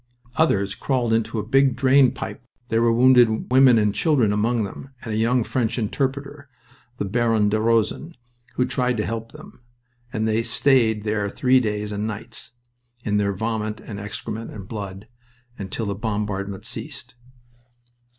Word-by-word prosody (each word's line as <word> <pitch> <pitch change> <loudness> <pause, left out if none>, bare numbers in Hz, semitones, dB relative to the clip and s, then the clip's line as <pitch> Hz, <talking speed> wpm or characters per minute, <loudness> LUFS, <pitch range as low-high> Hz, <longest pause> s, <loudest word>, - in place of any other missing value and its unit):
Others 100 -11 +2
crawled 125 -4 0
into 115 0 0
a 105 - -2
big 135 +1 +3
drain 130 0 +5
pipe - - -7 0.3
there 115 0 +2
were 115 0 +4
wounded 120 -1 +4
women 130 -2 +6
and 105 -2 +2
children 130 -10 +2
among 110 +2 +1
them, 105 +6 -7
and 110 - -4
a - - -1
young 115 +2 +2
French 115 0 -1
interpreter, 140 +4 -3 0.5
the - - -2
Baron 110 0 +2
de 110 +1 0
Rosen, 115 +9 0 0.4
who 125 - +2
tried 125 -1 0
to 105 - -1
help 115 0 -4
them - - -14 0.5
and 110 0 -1
they 110 +1 +1
stayed 115 -3 +2
there 105 -1 -1
three 130 +5 +3
days 105 -3 -2
and 105 +1 -2
nights, 115 +2 -7 0.5
in 105 -2 0
their 100 -1 +1
vomit 110 +1 -2
and 100 -3 -8
excrement 110 +2 -6
and 100 -3 -9
blood, 100 -2 -7 0.5
until 100 +3 -4
the 100 - -2
bombardment 100 -2 -3
ceased. - - -7
115 Hz, 160 wpm, -23 LUFS, 105-125 Hz, 0.5 s, women